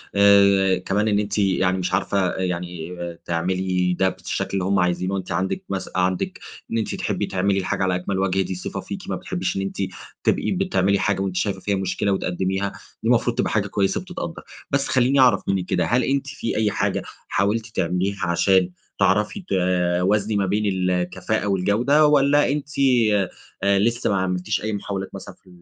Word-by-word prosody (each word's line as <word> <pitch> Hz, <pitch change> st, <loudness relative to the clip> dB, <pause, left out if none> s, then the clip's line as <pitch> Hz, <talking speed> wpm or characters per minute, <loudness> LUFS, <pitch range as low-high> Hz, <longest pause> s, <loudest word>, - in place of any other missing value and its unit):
آآ 100 Hz, -2 st, +5 dB
كمان 100 Hz, +4 st, 0 dB
إن 105 Hz, -1 st, +2 dB
أنتِ 105 Hz, 0 st, -2 dB
يعني 95 Hz, -2 st, +2 dB
مش 90 Hz, 0 st, -2 dB
عارفة 95 Hz, -1 st, +1 dB
يعني 90 Hz, -2 st, -4 dB, 0.3 s
تعملي 90 Hz, +1 st, 0 dB
ده 95 Hz, +1 st, +2 dB
بالشكل -, -, -4 dB
اللي 95 Hz, -, 0 dB
هم 95 Hz, +1 st, +2 dB
عايزينه. 90 Hz, +2 st, 0 dB
أنتِ 95 Hz, -1 st, -6 dB
عندِك 95 Hz, +1 st, -1 dB
مس 95 Hz, -1 st, -3 dB
عندِك 90 Hz, 0 st, 0 dB, 0.3 s
إن 115 Hz, -, 0 dB
أنتِ 110 Hz, -, -2 dB
تحبّي -, -, -2 dB
تعملي 95 Hz, +1 st, 0 dB
الحاجة 95 Hz, 0 st, -1 dB
على 95 Hz, -1 st, +1 dB
أكمَل 95 Hz, +2 st, -2 dB
وَجه. 95 Hz, 0 st, +1 dB
دي 95 Hz, 0 st, -3 dB
صفة 90 Hz, -, -5 dB
فيكِ، -, -, -6 dB
ما -, -, -1 dB
بتحبّيش 90 Hz, +2 st, -3 dB
إن -, -, 0 dB
أنتِ 95 Hz, -, -4 dB, 0.5 s
تبقي -, -, +1 dB
بتعملي 100 Hz, -, +1 dB
حاجة، 95 Hz, 0 st, 0 dB
وأنتِ 95 Hz, -2 st, -2 dB
شايفة 95 Hz, 0 st, -1 dB
فيها 100 Hz, +1 st, -1 dB
مشكلة، 95 Hz, +1 st, -1 dB
وتقدّميها. 95 Hz, +1 st, -1 dB, 0.3 s
دي -, -, +1 dB
المفروض -, -, +2 dB
تبقى -, -, 0 dB
حاجة -, -, +1 dB
كويّسة 100 Hz, -1 st, 0 dB
بتتقدّر. -, -, -6 dB, 0.3 s
بس 140 Hz, 0 st, +1 dB
خلّيني 130 Hz, +2 st, +3 dB
أعرف 125 Hz, -2 st, +5 dB
منِّك 95 Hz, -2 st, 0 dB
كده، -, -, 0 dB
هل 125 Hz, +2 st, +2 dB
أنتِ 135 Hz, +2 st, 0 dB
في 130 Hz, -3 st, -4 dB
أي 110 Hz, -1 st, +2 dB
حاجة -, -, 0 dB, 0.3 s
حاولتِ 105 Hz, +3 st, 0 dB
تعمليها 95 Hz, -1 st, -1 dB
عشان 90 Hz, +1 st, +3 dB, 0.3 s
تعرفي 105 Hz, -, +2 dB
توازني 90 Hz, +3 st, +1 dB
ما 100 Hz, -, +1 dB
بين 105 Hz, +3 st, 0 dB
الكفاءة، 90 Hz, +2 st, -1 dB
والجودة؟ 110 Hz, +10 st, +3 dB
والّا 145 Hz, 0 st, +4 dB
أنتِ 145 Hz, 0 st, -3 dB, 0.9 s
آآ 100 Hz, 0 st, +3 dB
لسّه 115 Hz, +4 st, +1 dB
ما 100 Hz, -, +1 dB
عملتيش 90 Hz, +2 st, -1 dB
أي 110 Hz, 0 st, -2 dB
محاولات 100 Hz, -1 st, -4 dB
مثلًا 95 Hz, -1 st, -9 dB
في -, -, -27 dB
95 Hz, 180 wpm, -23 LUFS, 90-105 Hz, 0.9 s, آآ